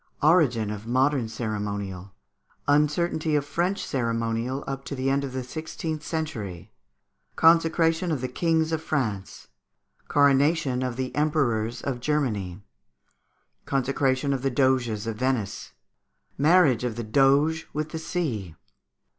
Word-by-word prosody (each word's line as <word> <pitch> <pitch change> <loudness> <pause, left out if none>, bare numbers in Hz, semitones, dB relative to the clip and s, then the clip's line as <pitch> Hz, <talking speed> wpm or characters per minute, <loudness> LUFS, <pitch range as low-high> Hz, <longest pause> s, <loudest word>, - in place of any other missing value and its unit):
Origin 135 - +3
of 105 +1 -7
Modern 130 0 +2
Ceremonial. 100 -4 -4 0.6
Uncertainty 150 +2 +2
of 145 -1 +1
French 175 +7 -1
Ceremonial 115 +1 -2
up 135 0 -5
to 140 - -5
the 130 +1 0
End 140 +1 +1
of 135 - -4
the 130 0 -4
Sixteenth 155 +3 -5
Century. 120 - -5 0.6
Consecration 165 +1 +3
of 150 - 0
the 130 - -2
Kings 160 +4 0
of 160 -1 -1
France. 110 -12 -3 0.6
Coronation 140 -1 +3
of 125 -2 -2
the 130 0 -3
Emperors 130 -7 0
of 130 -3 -2
Germany. 110 -10 -1 1.0
Consecration 135 0 +1
of 135 - -2
the 135 - +1
Doges 125 -5 +1
of 115 -1 -4
Venice. 125 -5 -2 0.6
Marriage 150 -6 +4
of 120 -3 -2
the 120 - -4
Doge 140 +7 +3
with 155 +1 -3
the 160 - -5
Sea. 125 - -3
135 Hz, 130 wpm, -26 LUFS, 115-155 Hz, 1.0 s, Marriage